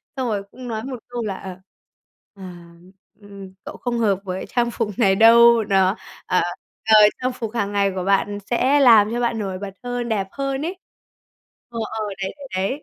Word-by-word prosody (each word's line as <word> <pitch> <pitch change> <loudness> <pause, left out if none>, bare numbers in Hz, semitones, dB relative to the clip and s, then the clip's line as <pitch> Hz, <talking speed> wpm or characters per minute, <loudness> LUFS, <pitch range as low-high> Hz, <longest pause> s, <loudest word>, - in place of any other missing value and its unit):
xong 260 -2 -2
rồi 205 -3 -2
cũng 255 -1 -10
nói 220 -1 -4
một 255 -3 -6
câu 240 -1 -5
là, 200 -3 -3
ờ, 190 -1 -9 0.8
ờ, 195 - -12 0.8
ừm, 200 -2 -12
"Cậu - - -9
không 240 -1 -3
hợp 200 -4 +1
với 185 -1 -5
trang 240 -1 0
phục 225 -3 -2
này 195 -5 +3
đâu, 230 +1 +6
đó. 195 0 +2 0.3
Ờ, 180 - +1 0.4
ờ, 220 -1 +5 0.3
trang 255 0 0
phục 225 -3 -5
hàng 205 -3 -2
ngày 200 -1 +1
của 185 - -3
bạn 200 +1 +1
sẽ 260 +4 +2
làm 225 -5 +6
cho 240 - -2
bạn 235 -2 -1
nổi 195 -3 -4
bật 200 -1 -7
hơn, 245 -1 -4
đẹp 195 -3 -1
hơn 275 0 -3
ấy." 365 +2 -5 0.9
Ờ, 230 -1 -6 0.2
ờ, 215 - -2 0.2
đấy, 190 - -4
đấy, 280 -1 -10
đấy. 200 +11 -2
220 Hz, 195 wpm, -21 LUFS, 195-245 Hz, 0.9 s, đâu